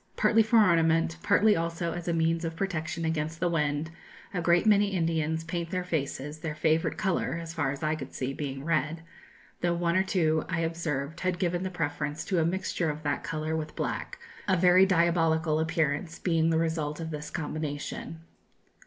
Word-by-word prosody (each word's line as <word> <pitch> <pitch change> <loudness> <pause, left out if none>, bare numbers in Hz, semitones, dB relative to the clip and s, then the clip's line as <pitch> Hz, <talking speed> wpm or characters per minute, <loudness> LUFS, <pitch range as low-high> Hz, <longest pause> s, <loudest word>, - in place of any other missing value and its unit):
Partly 225 0 +4
for 225 +2 +3
ornament, 165 -4 +4
partly 210 0 +4
also 170 0 -2
as 175 -1 -6
a - - +2
means 165 0 +1
of 165 -1 -3
protection 165 -3 -2
against 160 0 -2
the 175 - +1
wind, 150 -1 0 0.4
a 180 - -1
great 170 +2 +3
many 205 -1 +5
Indians 165 -4 0
paint 170 0 -3
their 180 0 -2
faces, 150 -3 -3
their 155 -1 -4
favourite 160 +1 +1
colour, 190 -3 0
as 165 -1 -7
far 160 -5 0
as 140 +2 -5
I 155 0 +1
could 140 -4 -6
see, 130 +1 -3
being 135 -2 -5
red, 165 0 0 0.6
though 175 0 +1
one 170 0 0
or 185 - +5
two 160 -5 +1
I 165 - 0
observed 160 -3 -2
had 185 -1 0
given 175 -1 0
the 185 - -2
preference 150 -3 -3
to 185 -3 +1
a 160 - +2
mixture 175 -1 -1
of 150 +1 -5
that 145 -1 -1
colour 155 +1 -2
with 155 -1 -4
black, - - -3 0.3
a 190 -2 +3
very 180 +2 +6
diabolical 165 -3 +2
appearance 160 0 0
being 165 -2 +1
the 160 - +2
result 160 -2 -1
of 165 -1 -4
this 150 0 -5
combination." 155 +1 -4
165 Hz, 190 wpm, -28 LUFS, 155-175 Hz, 0.6 s, very